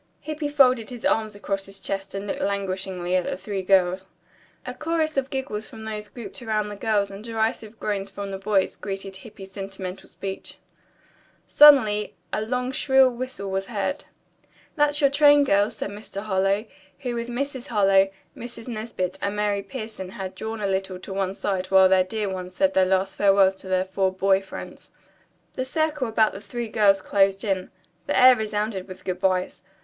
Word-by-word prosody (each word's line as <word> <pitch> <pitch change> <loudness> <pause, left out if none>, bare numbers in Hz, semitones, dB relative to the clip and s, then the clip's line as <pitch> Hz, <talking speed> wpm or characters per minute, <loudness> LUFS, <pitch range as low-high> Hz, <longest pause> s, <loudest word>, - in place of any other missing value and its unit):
Hippy 310 -1 -3
folded 255 -6 +4
his 245 -2 -7
arms 215 -2 +1
across 195 -1 -3
his 195 0 -8
chest 195 0 -4
and 195 +1 -4
looked 200 - -4
languishingly 190 -2 -2
at 185 - +1
the - - -3
three 195 +1 -4
girls. 185 0 +2 0.6
A 250 - -5
chorus 315 +2 -1
of 270 -1 0
giggles 260 -6 -3
from 220 - -10
those 215 -1 -5
grouped 230 0 -9
around 215 -2 -1
the 205 - -6
girls 205 -1 0
and 195 +2 -9
derisive 225 -1 -2
groans 200 -2 -2
from 200 0 -6
the 195 - -5
boys 195 -1 +1
greeted 195 -1 -6
Hippy's 195 -1 -12
sentimental 190 -1 -7
speech. 195 -1 -7 0.9
Suddenly 235 -9 +6 0.2
a - - 0
long, 250 +3 -2
shrill 265 -1 +4
whistle 240 -5 -5
was 195 0 -2
heard. 220 +6 -3 0.7
"That's 295 -1 +2
your 280 -1 +4
train, 290 0 +6
girls," 205 -5 +2
said 200 - -4
Mr. 205 -1 -7
Harlowe, 195 +1 +1 0.4
who 245 - -3
with 235 0 -3
Mrs. 260 +1 -4
Harlowe, 195 -3 +4 0.3
Mrs. 235 -1 -9
Nesbit 215 -6 -4
and 200 +1 -1
Mary 205 -1 0
Pierson 215 -5 -7
had 190 0 -6
drawn 220 0 -5
a 200 - 0
little 190 -1 -2
to 190 +1 -8
one 195 0 -1
side 190 -3 -2
while 190 -1 +6
their 185 0 +4
dear 210 +3 -3
ones 185 -1 -5
said 285 0 +2
their 185 -1 +4
last 190 +1 0
farewells 195 -1 +5
to 190 - -10
their 185 0 +1
four 190 0 0
boy 190 +1 +2
friends. 195 - -10 0.6
The 255 - -2
circle 300 0 -1
about 220 -1 +3
the 195 - -8
three 230 +3 -5
girls 200 -3 +3
closed 195 0 +2
in. 190 -3 -1 0.4
The - - +1
air 255 0 +8
resounded 210 -3 -2
with 185 -1 -11
good 180 -1 -2
byes. 185 -1 0
205 Hz, 185 wpm, -24 LUFS, 190-235 Hz, 0.9 s, air